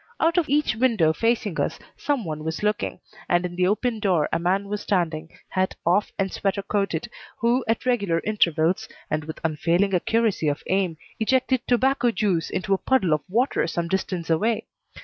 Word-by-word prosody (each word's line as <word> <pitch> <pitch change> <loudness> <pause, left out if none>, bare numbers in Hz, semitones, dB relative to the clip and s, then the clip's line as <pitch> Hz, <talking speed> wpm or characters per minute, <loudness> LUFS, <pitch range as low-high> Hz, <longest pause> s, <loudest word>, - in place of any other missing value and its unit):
Out 335 +2 +3
of 320 - -2
each 290 -5 +2
window 220 -10 +3
facing 225 -3 0
us - - -1 0.2
some 280 -7 -1
one 155 -1 -4
was 160 +5 -4
looking, 210 0 -1 0.3
and 175 0 +2
in 175 -1 -5
the 180 0 +2
open 225 +3 0
door 185 -7 +2
a - - +2
man 190 +4 0
was 210 0 -3
standing, 165 -4 -1 0.2
hat 185 0 0
off 180 +5 +2
and 195 -1 -1
sweater 200 0 -1
coated, 195 -6 -1 0.3
who, 240 +3 +2
at 225 +2 0
regular 200 -10 +1
intervals, 185 0 +1 0.2
and 155 0 -1
with 160 - -7
unfailing 170 +5 +1
accuracy 215 -1 +1
of 145 +1 -1
aim, 185 -4 0 0.2
ejected 260 +2 +2
tobacco 255 +1 +3
juice 200 -7 0
into 195 +1 -1
a 190 - +1
puddle 225 -12 +2
of 155 - +1
water 235 -3 +1
some 170 0 -2
distance 185 -2 -2
away. 215 +8 +1
195 Hz, 180 wpm, -24 LUFS, 170-230 Hz, 0.3 s, Out